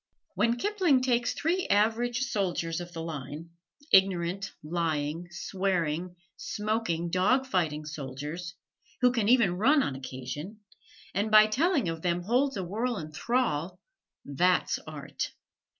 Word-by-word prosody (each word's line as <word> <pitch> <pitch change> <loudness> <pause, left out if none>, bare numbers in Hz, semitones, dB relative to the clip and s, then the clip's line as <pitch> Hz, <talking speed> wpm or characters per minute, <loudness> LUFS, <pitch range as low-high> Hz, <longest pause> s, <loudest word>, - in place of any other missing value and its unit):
When 220 +5 +2
Kipling 360 -7 +2
takes 240 -2 +2
three 355 +4 0
average 230 +4 +2
soldiers 180 -8 -1
of 175 0 -8
the 165 -2 -6
line, 155 +1 -6 0.4
ignorant, 190 0 +3
lying, 160 0 -2
swearing, 175 -2 -2 0.2
smoking, 210 -4 -2
dog 215 +9 +3
fighting 160 - -1
soldiers, 150 +5 -6 0.5
who 250 0 +5
can 225 -4 +1
even 220 -8 +4
run 280 +6 +5
on 135 - -2
occasion, 135 - -7 0.5
and 205 +3 0
by 215 0 +8
telling 275 - +1
of 165 -1 -3
them 175 0 0
holds 255 +6 +1
a 190 - -2
world 225 +6 -2
in 155 -1 -7
thrall 180 - -1 0.5
that's 180 +6 +2
art! 145 -2 -5
185 Hz, 130 wpm, -29 LUFS, 165-235 Hz, 0.5 s, by